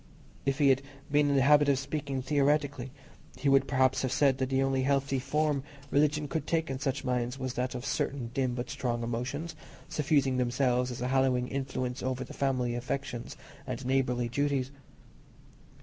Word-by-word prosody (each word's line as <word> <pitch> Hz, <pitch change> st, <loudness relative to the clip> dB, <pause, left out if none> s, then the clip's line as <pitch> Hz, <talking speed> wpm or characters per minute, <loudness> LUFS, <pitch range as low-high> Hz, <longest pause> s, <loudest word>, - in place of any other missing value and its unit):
If 135 Hz, 0 st, +2 dB
he 145 Hz, -3 st, +4 dB
had 135 Hz, 0 st, +4 dB, 0.3 s
been 145 Hz, 0 st, +4 dB
in 140 Hz, -, +2 dB
the 135 Hz, -, +4 dB
habit 145 Hz, +1 st, +6 dB
of 140 Hz, -, +4 dB
speaking 140 Hz, -1 st, -3 dB
theoretically, 145 Hz, -1 st, +1 dB, 0.5 s
he 140 Hz, -, +1 dB
would 135 Hz, 0 st, +4 dB
perhaps 130 Hz, -1 st, +2 dB
have 130 Hz, -, -1 dB
said 135 Hz, 0 st, +3 dB
that 130 Hz, -1 st, 0 dB
the 135 Hz, 0 st, +2 dB
only 135 Hz, -1 st, +1 dB
healthy 135 Hz, 0 st, +1 dB
form 145 Hz, +1 st, 0 dB, 0.3 s
religion 150 Hz, +1 st, +2 dB
could 160 Hz, +3 st, -3 dB
take 160 Hz, -3 st, 0 dB
in 130 Hz, -, -3 dB
such 135 Hz, 0 st, -2 dB
minds 125 Hz, -1 st, -1 dB
was 130 Hz, -2 st, -3 dB
that 125 Hz, +1 st, -2 dB
of 125 Hz, -, -5 dB
certain 125 Hz, -4 st, -2 dB
dim 130 Hz, -2 st, 0 dB
but 125 Hz, +3 st, -4 dB
strong 120 Hz, -4 st, -2 dB
emotions, 130 Hz, +8 st, -3 dB, 0.3 s
suffusing 140 Hz, -3 st, +2 dB
themselves 125 Hz, 0 st, +1 dB
as 125 Hz, -1 st, -6 dB
a 125 Hz, -, -1 dB
hallowing 130 Hz, -2 st, +2 dB
influence 130 Hz, -1 st, -3 dB
over 130 Hz, 0 st, -2 dB
the -, -, -10 dB
family 130 Hz, -3 st, 0 dB
affections 120 Hz, 0 st, -4 dB, 0.3 s
and 125 Hz, 0 st, -4 dB
neighbourly 125 Hz, -2 st, +1 dB
duties. 135 Hz, +1 st, 0 dB
135 Hz, 180 wpm, -30 LUFS, 125-140 Hz, 0.5 s, habit